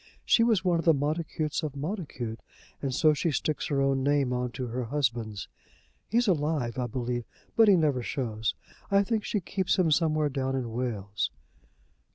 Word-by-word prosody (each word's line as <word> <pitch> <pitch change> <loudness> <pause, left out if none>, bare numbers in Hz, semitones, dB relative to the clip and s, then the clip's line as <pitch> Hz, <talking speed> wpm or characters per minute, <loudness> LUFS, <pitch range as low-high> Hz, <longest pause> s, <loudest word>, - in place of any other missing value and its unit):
She 230 - +5
was 220 -5 +2
one 175 -2 +3
of - - -3
the 165 -2 +6
Montacutes 155 +1 -1
of 150 -4 -4
Montacute, 140 - -4 0.4
and 135 - -1
so 155 +4 +4
she 150 +3 0
sticks 155 0 -1
her 140 -2 0
own 135 -1 +2
name 140 -2 +2
on 125 0 -1
to 130 - -3
her 120 +1 -3
husband's. 115 -6 -1 0.6
He's 240 +1 +2
alive, 150 - 0
I 125 - 0
believe, 120 0 -3 0.3
but 225 -1 +6
he 200 - +7
never 150 -7 +2
shews. 110 -3 -2 0.3
I 200 0 +4
think 215 +1 -1
she 210 - -1
keeps 190 +1 0
him 175 -4 +3
somewhere 155 -1 +2
down 135 -1 -1
in 125 -3 -3
Wales." 105 -5 -2
145 Hz, 180 wpm, -28 LUFS, 125-165 Hz, 0.6 s, he